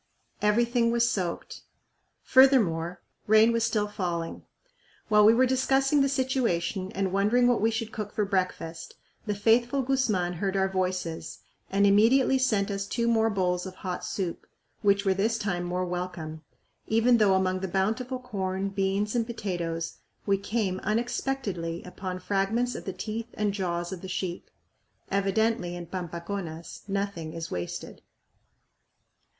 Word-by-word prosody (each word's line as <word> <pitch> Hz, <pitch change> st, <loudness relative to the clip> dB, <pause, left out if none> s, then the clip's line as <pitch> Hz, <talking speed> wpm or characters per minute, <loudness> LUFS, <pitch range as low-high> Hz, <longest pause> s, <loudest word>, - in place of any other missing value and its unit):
Everything 235 Hz, +3 st, +3 dB
was 235 Hz, 0 st, +3 dB
soaked. 185 Hz, -7 st, -3 dB, 0.6 s
Furthermore, 180 Hz, -11 st, +4 dB, 0.2 s
rain 220 Hz, +2 st, +6 dB
was 230 Hz, -1 st, +1 dB
still 215 Hz, -2 st, +1 dB
failing. 175 Hz, -5 st, -3 dB, 0.7 s
While 210 Hz, -1 st, +6 dB
we 215 Hz, +2 st, +8 dB
were 260 Hz, +2 st, +5 dB
discussing 270 Hz, +2 st, +2 dB
the 275 Hz, -, +3 dB
situation 230 Hz, -9 st, 0 dB
and 190 Hz, -1 st, -1 dB
wondering 215 Hz, +5 st, +3 dB
what 245 Hz, -3 st, +2 dB
we 225 Hz, -, +4 dB
should 225 Hz, 0 st, -3 dB
cook 210 Hz, -2 st, -5 dB
for 210 Hz, -, 0 dB
breakfast, 185 Hz, -4 st, -3 dB, 0.3 s
the 210 Hz, -, 0 dB
faithful 240 Hz, +6 st, +3 dB
Guzman 220 Hz, -10 st, +1 dB
heard 195 Hz, -1 st, 0 dB
our 190 Hz, 0 st, +3 dB
voices 185 Hz, -3 st, -3 dB, 0.3 s
and 200 Hz, +1 st, +3 dB
immediately 240 Hz, +7 st, +5 dB
sent 215 Hz, -6 st, +1 dB
us 195 Hz, 0 st, -3 dB
two 235 Hz, +2 st, -1 dB
more 225 Hz, -1 st, +3 dB
bowls 180 Hz, -3 st, 0 dB
of 185 Hz, -, -9 dB
hot 185 Hz, -1 st, -5 dB
soup, 180 Hz, -4 st, -4 dB, 0.3 s
which 200 Hz, 0 st, +3 dB
were 190 Hz, -, +4 dB
this 220 Hz, +4 st, +1 dB
time 190 Hz, -5 st, -2 dB
more 180 Hz, +1 st, -1 dB
welcome, 175 Hz, -3 st, -5 dB, 0.5 s
even 230 Hz, +2 st, +4 dB
though 200 Hz, -3 st, +5 dB
among 185 Hz, 0 st, +1 dB
the 190 Hz, -, -3 dB
bountiful 220 Hz, +8 st, -1 dB
corn, 195 Hz, -5 st, -3 dB
beans, 195 Hz, +1 st, 0 dB
and 230 Hz, -2 st, +1 dB
potatoes 175 Hz, -7 st, -3 dB, 0.3 s
we 200 Hz, -, +3 dB
came 200 Hz, -2 st, -1 dB
unexpectedly 215 Hz, -7 st, -2 dB
upon 180 Hz, 0 st, -6 dB
fragments 205 Hz, +6 st, 0 dB
of -, -, -7 dB
the 190 Hz, -, -2 dB
teeth 225 Hz, +3 st, -4 dB
and 210 Hz, -1 st, 0 dB
jaws 175 Hz, -3 st, -2 dB
of 185 Hz, -2 st, -6 dB
the 190 Hz, -, -7 dB
sheep. 185 Hz, -1 st, -4 dB, 0.6 s
Evidently 200 Hz, -1 st, +1 dB
in 175 Hz, -1 st, -6 dB
Pampaconas 170 Hz, -1 st, -6 dB
nothing 195 Hz, -5 st, -3 dB
is 165 Hz, 0 st, -6 dB
wasted. 90 Hz, 0 st, -5 dB
200 Hz, 145 wpm, -27 LUFS, 180-230 Hz, 0.7 s, we